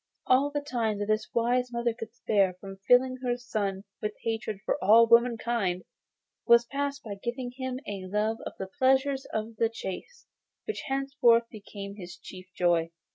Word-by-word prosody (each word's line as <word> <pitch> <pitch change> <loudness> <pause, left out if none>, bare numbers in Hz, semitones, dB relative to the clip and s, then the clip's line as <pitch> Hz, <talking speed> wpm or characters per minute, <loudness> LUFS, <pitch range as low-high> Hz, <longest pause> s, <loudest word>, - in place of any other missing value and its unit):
All 265 +3 +4
the 290 0 -2
time 235 -7 -1
that 205 - -2
this 215 +1 0
wise 245 +1 +1
mother 235 -1 0
could 225 -1 -8
spare 200 -6 +2
from 195 0 -9
filling 255 +1 +5
her 245 -1 -1
son 205 -5 -3 0.2
with 210 0 -3
hatred 220 -3 -2
for - - -1
all 225 +4 +7
womenkind 230 -5 +2 0.6
she 235 -1 +9
passed 280 0 -2
in 200 -2 -6
giving 245 +1 -3
him 260 -1 -4
a 195 -2 -5
love 210 +3 0
of - - -7
the 190 - -5
pleasures 265 +1 +3
of 220 +1 -4
the 230 - +2
chase, 230 - -7 0.4
which 435 - -4
henceforth 270 -4 +3
became 200 -2 -9
his 180 -2 -9
chief 185 +1 -11
joy. 170 -2 +2
230 Hz, 170 wpm, -28 LUFS, 200-255 Hz, 0.6 s, she